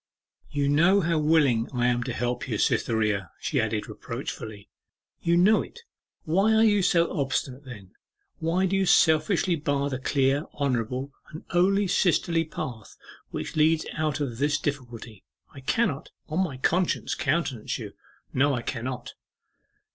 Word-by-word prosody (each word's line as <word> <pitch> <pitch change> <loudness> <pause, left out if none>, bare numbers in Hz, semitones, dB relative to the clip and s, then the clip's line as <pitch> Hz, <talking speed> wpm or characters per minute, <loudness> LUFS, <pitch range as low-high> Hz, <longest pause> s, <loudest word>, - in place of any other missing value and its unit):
'You 145 -1 0
know 170 +8 +4
how 165 -2 +1
willing 150 -7 +3
I 120 0 +1
am 120 0 +2
to 130 - -3
help 125 +3 -2
you, 110 -4 -2
Cytherea,' 105 -5 +1
she - - 0
added 110 -1 -2
reproachfully. 105 -3 -7 0.5
'You 170 0 +2
know 205 +5 +5
it. 470 - -11 0.4
Why 195 +7 +2
are 220 - +5
you 205 -2 +4
so 170 -2 +2
obstinate 135 0 -2
then? 105 -8 -11 0.5
Why 170 +4 +1
do 190 +1 0
you 195 -1 +1
selfishly 165 +3 +3
bar 145 -2 -1
the 130 - -3
clear, 135 +2 +1
honourable, 130 0 -2 0.2
and 155 - -9
only 195 +3 +3
sisterly 170 -2 +2
path 120 -8 -7 0.3
which - - -5
leads 155 +1 +3
out 155 -1 -1
of 125 -5 -3
this 145 +1 +2
difficulty? 120 -7 -5 0.3
I 140 - -10
cannot, 140 - -1 0.2
on 165 +5 0
my 145 -8 -4
conscience, 175 +7 0
countenance 145 -7 -1
you; - - -8 0.4
no, 140 +1 +2
I 120 - -4
cannot. 125 0 -5
145 Hz, 150 wpm, -26 LUFS, 125-170 Hz, 0.5 s, know